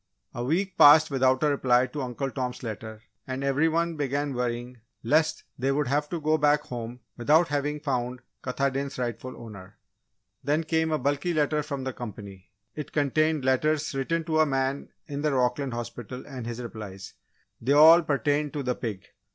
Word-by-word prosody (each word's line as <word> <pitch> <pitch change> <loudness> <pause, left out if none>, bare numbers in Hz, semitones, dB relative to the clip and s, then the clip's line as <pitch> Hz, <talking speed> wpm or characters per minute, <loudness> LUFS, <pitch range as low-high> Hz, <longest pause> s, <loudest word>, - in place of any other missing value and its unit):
A 120 - -4
week 180 +7 -1
passed 150 +1 +8
without 130 0 +2
a 150 - +4
reply 125 -3 +3
to 145 +2 -6
Uncle 130 +1 -3
Tom's 125 -2 -4
letter 110 -1 -7 0.2
and 130 +1 -4
every 140 +4 +2
one 165 0 0
began 145 0 -1
worrying 120 0 -3 0.2
lest 155 +1 +2 0.2
they 135 +2 +1
would 145 0 0
have 145 +2 0
to 170 - -3
go 155 +1 +1
back 150 0 +4
home 120 -2 -7 0.2
without 155 +8 +4
having 145 +1 -1
found 125 -4 -2 0.2
Katahdin's 135 +1 -2
rightful 125 +1 -4
owner. 100 -5 -11 0.7
Then 150 +3 +1
came 160 0 0
a 155 - +2
bulky 145 +4 -1
letter 150 0 +1
from 140 -2 -5
the 130 0 -3
company. 100 -5 -9 0.2
It 150 - -7
contained 155 0 +1
letters 150 +4 +1
written 165 +5 -1
to 155 -1 0
a 155 - +6
man 135 0 -1 0.2
in 145 -1 -5
the 150 -1 +1
Rockland 125 0 0
hospital 120 +1 -7
and 130 -4 -7
his 120 0 -5
replies. 105 -4 -8 0.5
They 130 +5 +2
all 160 +4 +8
pertained 145 -1 0
to 145 -2 -3
the 125 -1 0
pig. 105 -6 -5
140 Hz, 175 wpm, -27 LUFS, 125-150 Hz, 0.7 s, passed